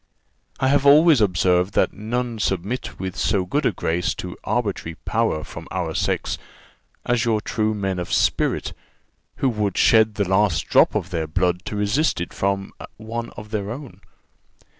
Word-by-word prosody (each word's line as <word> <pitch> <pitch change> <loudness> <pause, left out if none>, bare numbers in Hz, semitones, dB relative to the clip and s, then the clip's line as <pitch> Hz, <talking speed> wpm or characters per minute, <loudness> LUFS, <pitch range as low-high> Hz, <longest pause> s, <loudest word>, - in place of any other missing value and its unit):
"I 130 - +2
have 140 0 +3
always 150 -2 +7
observed 90 -1 +2
that - - +2
none 120 +2 -3
submit 100 +5 -2
with 95 -1 -4
so 95 -3 +1
good 145 +9 0
a - - +2
grace 85 -1 -1
to - - -6
arbitrary 80 0 -2
power 110 -8 -1
from - - -9
our 85 -3 -3
sex - - -1 0.7
as 120 -1 +1
your 115 -3 +1
true 110 0 -1
men 95 -3 -2
of 90 - -5
spirit, - - +1 0.6
who 135 - +1
would 105 -5 -1
shed 110 -2 +4
the 100 -2 0
last 95 -3 +2
drop - - +4
of 90 - -2
their 80 -3 -2
blood 90 +2 0
to 105 - -4
resist 105 - +1
it 85 - -5
from 100 0 -1 0.2
one 115 +2 -5
of 105 0 -9
their 105 -2 -2
own. 135 +3 -8
105 Hz, 165 wpm, -22 LUFS, 90-115 Hz, 0.7 s, always